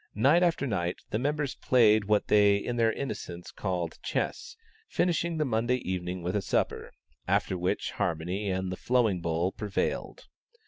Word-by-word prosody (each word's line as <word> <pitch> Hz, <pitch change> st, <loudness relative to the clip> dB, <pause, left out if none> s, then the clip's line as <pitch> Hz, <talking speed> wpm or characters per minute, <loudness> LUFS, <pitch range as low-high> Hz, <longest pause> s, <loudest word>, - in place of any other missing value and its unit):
Night 140 Hz, -, +4 dB
after 170 Hz, -5 st, +2 dB
night 90 Hz, -8 st, -1 dB
the 105 Hz, -, 0 dB
members 145 Hz, +1 st, -1 dB
played 110 Hz, -4 st, +4 dB
what 105 Hz, 0 st, +2 dB
they 105 Hz, -1 st, +5 dB
in 120 Hz, +4 st, -3 dB
their 115 Hz, -1 st, +3 dB
innocence 90 Hz, -10 st, -6 dB
called 90 Hz, -4 st, -3 dB
chess, -, -, -3 dB, 0.3 s
finishing 170 Hz, -1 st, 0 dB
the 155 Hz, -, +1 dB
Monday 120 Hz, 0 st, +1 dB
evening 90 Hz, -1 st, -3 dB
with 90 Hz, +3 st, -2 dB
a 105 Hz, -, +1 dB
supper, -, -, -1 dB, 0.4 s
after -, -, +1 dB
which 90 Hz, +1 st, -1 dB
harmony 90 Hz, +5 st, -2 dB
and 95 Hz, 0 st, -1 dB
"the -, -, -3 dB
flowing 115 Hz, -8 st, +1 dB
bowl" 85 Hz, +2 st, 0 dB
prevailed. 105 Hz, -, -3 dB
105 Hz, 155 wpm, -29 LUFS, 90-125 Hz, 0.4 s, they